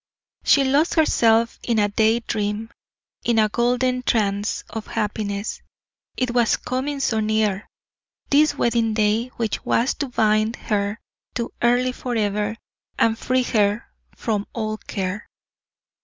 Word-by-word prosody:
She 280 - +5
lost 280 +5 +2
herself 230 -7 +3
in 235 -2 0
a 205 -1 +3
day 220 +3 +2
dream, 210 0 -3 0.5
in 235 -1 +1
a 215 -1 +4
golden 250 +2 +1
trance 205 -4 0
of 225 -1 -7
happiness: 205 0 -3 0.6
it 255 -1 0
was 240 -2 +3
coming 275 +3 -3
so 225 -5 +1
near, 215 -2 0 0.6
this 300 +2 +4
wedding 230 -2 +1
day 215 +2 +2
which 225 -2 -2
was 240 +3 +1
to 285 - -1
bind 215 -1 +2
her 205 0 -2 0.4
to 235 -1 -3
Earle 245 +1 +3
forever, 210 -4 -1 0.4
and 225 -1 +3
free 255 +2 0
her 210 -2 +1 0.3
from 210 -3 -2
all 215 -2 -2
care. 195 +1 -4
225 Hz, 130 wpm, -22 LUFS, 210-245 Hz, 0.6 s, She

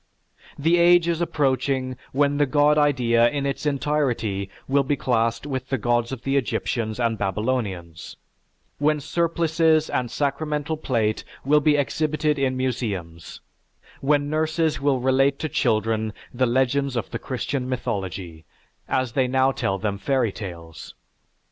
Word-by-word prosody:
The 165 +4 +3
age 175 0 +5
is 170 0 0
approaching 130 -4 0 0.2
when 145 +1 +2
the 145 -1 +3
god 145 +2 +4
idea 125 -6 +3
in 140 -1 -2
its 140 +2 -2
entirety 130 -9 -1 0.2
will 140 +1 +3
be 140 +2 0
classed 115 -2 0
with 130 -3 -4
the 135 - 0
gods 120 +1 0
of 130 -2 -6
the 135 +1 +1
Egyptians 115 -2 -2
and 115 -2 0
Babylonians, 95 -6 -3 0.6
when 150 +1 +2
surplices 160 0 +1
and 125 -2 -1
sacramental 150 +2 -2
plate 115 -8 -1 0.2
will 150 +2 +5
be 150 0 +3
exhibited 150 +1 0
in 130 -1 0
museums; 105 -11 -4 0.6
when 145 +1 +2
nurses 155 0 0
will 140 -2 +2
relate 135 +2 +2
to 155 - -3
children 110 -4 0 0.2
the 130 +1 +1
legends 130 +2 +1
of 115 -5 -3
the - - -3
Christian 130 0 -3
mythology, 95 -9 -4 0.5
as 130 -2 0
they 130 +2 +1
now 130 +1 +3
tell 95 -6 -1
them 100 0 -3
fairy 125 0 +1
tales. 85 -6 -9
130 Hz, 140 wpm, -23 LUFS, 115-145 Hz, 0.6 s, age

